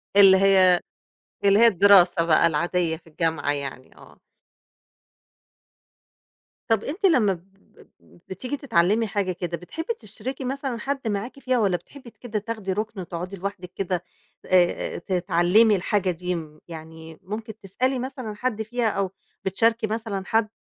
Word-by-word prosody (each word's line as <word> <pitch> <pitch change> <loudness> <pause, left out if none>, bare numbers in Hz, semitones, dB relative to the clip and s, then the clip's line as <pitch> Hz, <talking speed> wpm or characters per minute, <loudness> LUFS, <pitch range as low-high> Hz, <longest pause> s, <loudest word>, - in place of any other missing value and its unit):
اللي 195 -1 +8
هي 190 -2 +5 0.7
اللي 200 +1 +5
هي 235 - +8
الدراسة 190 -4 +5
بقى 165 -1 +4
العادية 170 +1 0
في 165 - -24
الجامعة 160 -2 -1
يعني، 140 -2 -5
آه. - - -17 2.5
طَب 225 -2 +2
أنتِ 350 +8 -3
لمّا 245 - +4
ب 170 -2 -11 0.6
ب 85 0 -22
بتيجي 250 +10 -4
تتعلّمي 225 - +2
حاجة 200 -2 -1
كده 175 -1 -4
بتحبّي 325 - -5
تشرِكي 265 - -7
مثلًا 270 -1 -3
حد 270 -2 -3
معاكِ 220 +6 -3
فيها 255 -2 0
والّا 195 -5 +2
بتحبّي 260 +5 -14
ت - - -26
كده 220 -4 -4
تاخدي 210 -3 -4
رُكن 215 +1 -4
وتقعُدي 180 +1 -6
لوحدِك 185 -1 -6
كده 180 -2 -2 0.4
آآ 180 -2 +2
آآ - - -3
تتعلّمي 180 +4 +3
الحاجة 190 0 0
دي 180 +1 -3
م 155 -2 -8
يعني 160 -1 -10
ممكن 215 +2 -7
تسألي 255 +7 -1
مثلًا 255 -3 -5
حد 225 0 -2
فيها 230 +1 -1
أو 195 -2 -2 0.3
بتشاركي 225 +4 +1
مثلًا 215 -3 -3
حد 220 0 +1
195 Hz, 150 wpm, -24 LUFS, 175-225 Hz, 2.5 s, اللي